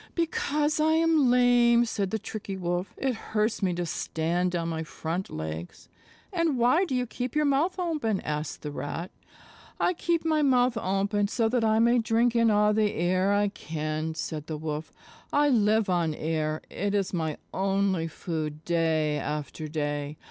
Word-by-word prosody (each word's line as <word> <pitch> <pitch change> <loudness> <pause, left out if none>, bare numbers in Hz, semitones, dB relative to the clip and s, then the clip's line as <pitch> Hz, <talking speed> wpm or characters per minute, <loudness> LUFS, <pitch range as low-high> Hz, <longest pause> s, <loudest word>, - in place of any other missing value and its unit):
"Because 305 -3 0
I 315 +1 +3
am 320 -4 +4
lame," 240 -1 +5
said 200 -4 -2
the 220 - -1
Tricky 205 -2 -6
Wolf. 175 +1 -2
"It 265 -1 0
hurts 220 -1 -1
me 190 -2 +2
to 175 0 -2
stand 175 +2 -1
on 165 -1 -1
my 160 -1 -2
front 165 +3 -4
legs." 80 +2 -6 0.4
"And 335 -6 +1
why 250 +10 +4
do 270 - -2
you 250 0 0
keep 245 +2 -5
your 300 0 +3
mouth 290 +7 +1
open?" 305 - -1
asked 150 0 -4
the 150 - -4
Rat. 145 +6 -5 0.7
"I 360 - +2
keep 340 -1 -1
my 310 -1 +2
mouth 250 -3 +3
open 200 0 0
so 225 +2 +1
that 245 -1 +1
I 220 0 +3
may 235 +2 +4
drink 230 +1 +2
in 230 -1 +4
all 210 0 +4
the 210 -1 +2
air 185 +3 +1
I 205 0 +2
can," 155 -3 -4
said 155 -1 -5
the 155 - -4
Wolf. 155 0 -4 0.4
"I 290 0 +3
live 220 -3 +3
on 170 -4 +1
air; 155 0 -2
it 205 +1 -1
is 195 -2 0
my 160 -3 -1 0.2
only 195 -3 +1
food 155 -1 -5
day 160 -3 +1
after 150 +1 -4
day. 145 -1 -3
200 Hz, 175 wpm, -27 LUFS, 160-245 Hz, 0.7 s, lame